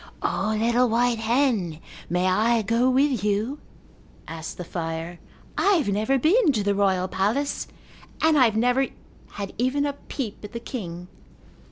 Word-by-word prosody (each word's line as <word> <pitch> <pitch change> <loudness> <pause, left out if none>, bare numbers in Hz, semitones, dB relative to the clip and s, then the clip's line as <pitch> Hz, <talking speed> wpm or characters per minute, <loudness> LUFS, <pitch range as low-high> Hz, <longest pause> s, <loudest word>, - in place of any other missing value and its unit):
"O, 215 +2 0
little 235 +2 +3
white 235 0 +2
hen, 225 - +1 0.3
may 180 +1 +1
I 220 +5 +2
go 230 +5 +2
with 260 -4 +2
you?" 210 +7 0 0.7
asked 160 0 -7
the 180 - -5
fire. 165 0 -5 0.4
"I 405 - +4
have 315 - +1
never 215 +7 +1
been 330 - +4
to 215 -4 0
the 200 0 +1
royal 190 -2 +1
palace 215 +10 -1 0.5
and 315 0 +4
I 265 -4 +6
have 220 -2 +1
never 250 +3 +2 0.5
had 200 -1 -5
even 265 +4 +1
a 285 - -1
peep 255 -6 -6
at 210 - -9
the 235 - -4
king." 180 -8 -6
225 Hz, 160 wpm, -24 LUFS, 195-260 Hz, 0.7 s, I